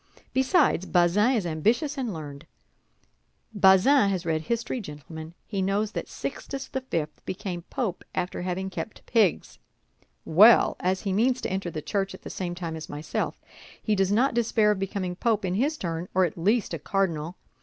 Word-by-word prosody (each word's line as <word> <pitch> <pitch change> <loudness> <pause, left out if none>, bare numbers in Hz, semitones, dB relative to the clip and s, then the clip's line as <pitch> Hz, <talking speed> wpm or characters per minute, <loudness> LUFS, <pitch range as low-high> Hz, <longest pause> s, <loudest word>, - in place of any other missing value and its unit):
Besides, 265 - +3
Bazin 190 +8 +3
is 220 -7 0
ambitious 225 - +1
and 255 -5 -2
learned; 150 -2 -8 1.1
Bazin 200 +5 +5
has 185 -3 -2
read 160 -1 0
history, 235 +6 -2
gentlemen, 160 0 -9
he 200 -3 -3
knows 200 +3 0
that - - -4
Sixtus 270 -1 -5
the 265 0 -4
Fifth 160 -12 -4
became 180 -2 -5
Pope 230 -10 -3
after 180 0 -2
having 185 +1 -3
kept 220 - -7
pigs. 220 -7 +1 0.7
Well, 210 +9 +6
as 185 +1 0
he 195 -2 -2
means 245 +5 +2
to - - -3
enter 190 -2 -2
the 155 -2 -6
Church 195 -2 -2
at - - -16
the - - -7
same 175 -2 -4
time 170 -2 -5
as 160 - -8
myself, 150 +1 -3 0.4
he 215 - 0
does 195 -1 +2
not 245 +6 +3
despair 225 -2 +3
of 205 - -1
becoming 190 -2 -3
Pope 215 0 0
in 180 - -1
his 285 +10 0
turn, 170 - -4
or 185 0 +5
at 165 - -4
least 200 +4 +1
a 165 - -3
cardinal. 170 -1 -1
190 Hz, 175 wpm, -26 LUFS, 170-225 Hz, 1.1 s, Well